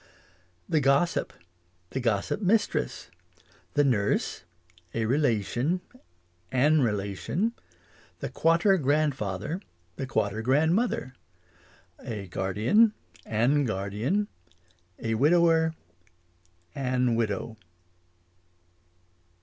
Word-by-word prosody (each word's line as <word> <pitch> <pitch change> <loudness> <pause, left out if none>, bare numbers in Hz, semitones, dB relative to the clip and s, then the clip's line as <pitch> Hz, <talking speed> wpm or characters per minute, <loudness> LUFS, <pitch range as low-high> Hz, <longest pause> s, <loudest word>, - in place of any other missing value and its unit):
The 155 - +2
gossip 140 +5 +2 0.6
The 130 - -2
gossip 115 - 0
mistress 205 - 0 0.6
The 145 - +4
nurse 105 -10 +1 0.5
A 115 -1 0
relation 125 - +1 0.7
An 145 +4 +4
relation 105 - -1 0.6
The 135 - -5
quater 165 - +3
grandfather 145 - -1 0.4
The 135 - -4
quater 110 -3 -1
grandmother 155 - +1 0.9
A 110 -6 -6
guardian 105 - +2 0.3
An 125 +7 +2
guardian 110 - -1 0.7
A 115 0 -2
widower 160 +5 +3 1.0
An 125 -2 0
widow. 110 0 -2
130 Hz, 75 wpm, -27 LUFS, 110-160 Hz, 1.0 s, The